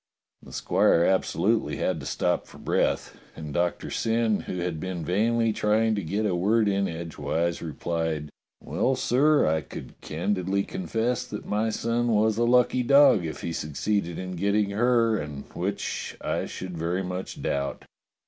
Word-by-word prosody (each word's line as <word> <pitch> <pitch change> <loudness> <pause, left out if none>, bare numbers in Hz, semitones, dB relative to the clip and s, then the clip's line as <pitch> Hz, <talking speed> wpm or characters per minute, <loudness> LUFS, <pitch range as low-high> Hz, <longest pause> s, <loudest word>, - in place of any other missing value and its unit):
" - - -58
The - - -11
squire 85 - +3
absolutely 95 +3 +1
had 90 -3 -1
to 70 - -7
stop - - 0
for - - -14
breath, - - -1 0.2
and 75 -2 -7
Doctor 85 +2 -1
Syn, 115 -1 +1
who 90 - -5
had 85 -2 -2
been 90 -2 -4
vainly 115 +5 +2
trying 110 +2 +2
to 105 - -1
get 100 +6 -1
a 100 - +1
word 105 +5 +2
in 100 -1 +1
edgewise, 85 0 -2
replied: 80 -1 -3 0.3
"Well, 105 - 0
sir, 145 +5 +3
I 80 0 +2
should - - -9
candidly 95 +3 -1
confess 110 +8 -1
that 105 - -7
my 110 +2 0
son 115 +2 0
was 110 -1 +2
a 120 - +3
lucky 125 +1 +4
dog 140 -7 +6
if 80 - -6
he 85 - -3
succeeded 85 +4 -2
in 95 0 -5
getting 100 +2 +1
her, 115 +1 +3
and 75 -2 -6
which, - - -3
I - - -2
should 90 -1 -6
very 85 +3 -1
much 90 +1 -5
doubt. 70 0 -2
100 Hz, 165 wpm, -26 LUFS, 85-110 Hz, 0.3 s, dog